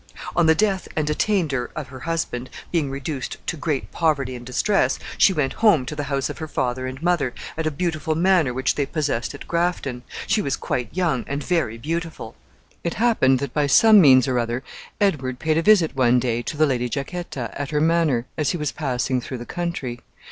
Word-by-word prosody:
On 170 -1 +4
the 160 - +6
death 195 0 +1
and 155 -1 0
attainder 150 - 0
of 155 -3 -5
her 130 0 -9
husband, 130 -5 -3 0.2
being 160 -5 +1
reduced 135 0 -4
to - - -2
great 150 -3 -2
poverty 140 -6 0
and 120 - -8
distress, 160 - +1 0.2
she - - +5
went 145 -6 0
home 200 - +5
to 150 - -5
the 145 -1 -3
house 140 -1 -1
of - - -7
her 160 - -4
father 130 -2 -2
and 130 +1 -6
mother, 170 -8 +1 0.2
at 160 -1 -2
a - - +3
beautiful 155 0 -2
manor 175 -5 +3
which 130 +2 0
they 140 -2 -1
possessed 145 -4 -2
at - - -11
Grafton. 170 -7 -1 0.2
She 220 0 +2
was 140 -8 -1
quite 125 - -2
young, 170 -8 0
and 140 +1 -3
very 160 -10 0
beautiful. 160 -4 -4 0.5
It 170 - -2
happened 220 - +3
that 140 - -4
by 150 -1 +1
some 215 +7 +7
means 130 -5 +6
or 125 -2 +1
other 120 +2 -2 0.4
Edward 135 -11 0
paid 160 +3 +1
a - - +1
visit 175 -6 +4
one 125 -2 +4
day 120 -1 -1
to 150 - -5
the 155 - +5
Lady 125 -4 0
Jacquetta, 140 -2 -4
at 145 -1 -4
her 150 - 0
manor, 160 -6 +2
as 150 - +1
he - - -1
was 150 -3 -2
passing 130 -3 -1
through 130 +1 -6
the 120 - -8
country. 170 -9 -4
145 Hz, 205 wpm, -23 LUFS, 130-170 Hz, 0.5 s, some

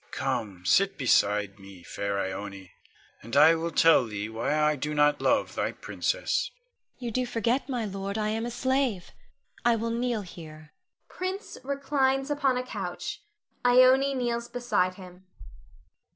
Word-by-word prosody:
Come, 95 -4 -3
sit 195 - +3
beside 105 -6 +2
me, 95 -2 -13
fair 100 +2 -3
Ione, 95 0 -5 0.5
and 115 - -7
I 155 +3 +8
will 165 +1 -2
tell 165 -6 +5
thee 105 0 -4
why 115 +6 -1
I 150 0 +3
do 150 +2 -3
not 150 0 +3
love - - +1
thy - - -2
princess. - - -1
Ione. - - -41
You 240 -2 -5
do 255 +3 0
forget, 240 +4 0
my 245 -4 -1
lord, 195 0 -4
I 215 -1 0
am 220 +1 -2
a 240 - -2
slave; 255 -6 -1 0.5
I 240 -1 +4
will 230 +1 -2
kneel 235 -1 -1
here. 155 -4 -12 0.3
[Prince 375 +3 -5
reclines 270 0 0
upon 275 -3 +1
a 250 - -1
couch. 255 - -5 0.4
Ione 255 +2 +5
_kneels 240 -2 -2
beside 240 -7 0
him. 185 0 -13
210 Hz, 150 wpm, -27 LUFS, -, 0.5 s, I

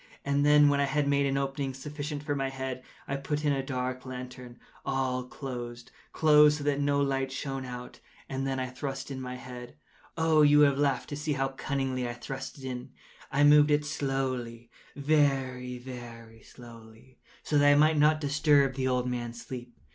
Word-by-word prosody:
And 140 0 +1
then, 150 0 +6
when 145 0 +3
I 140 - +3
had 145 +1 0
made 140 0 +2
an 135 0 0
opening 135 -1 -2
sufficient 145 +1 -5
for 145 -1 -1
my 135 -1 -1
head, 130 -1 -5 0.3
I 140 - -2
put 150 +2 -3
in 145 - +3
a 135 - 0
dark 130 -1 -3
lantern, 125 -1 -8 0.3
all 130 -2 -1
closed, 125 -2 -7 0.2
closed, 150 -1 +5
that 145 -1 0
no 140 0 +2
light 135 -1 0
shone 135 0 -4
out, 125 0 -8 0.3
and 135 0 -3
then 135 -1 -1
I 130 - -1
thrust 135 +1 -5
in 130 -1 -5
my 125 0 -5
head. 125 -1 -9 0.4
Oh, 160 -1 +4
you 145 0 +6
would 145 -1 +7
have 140 0 -2
laughed 140 -3 0
to 145 - -4
see 150 +1 -2
how 135 -1 0
cunningly 135 -2 -2
I - - -4
thrust 135 +3 -7
it 135 - -12
in! 125 -1 -5 0.4
I 140 +2 +3
moved 150 0 +7
it 150 0 +2
slowly—very, 135 0 -1
very 120 -3 -10
slowly, 115 +1 -15 0.2
so 150 - +2
that 145 0 +6
I - - +6
might 155 +1 +4
not 155 +1 +4
disturb 145 -2 +3
the 130 0 -1
old 125 -1 0
man’s 120 -1 -4
sleep. 125 -2 -8
135 Hz, 185 wpm, -29 LUFS, 125-145 Hz, 0.4 s, would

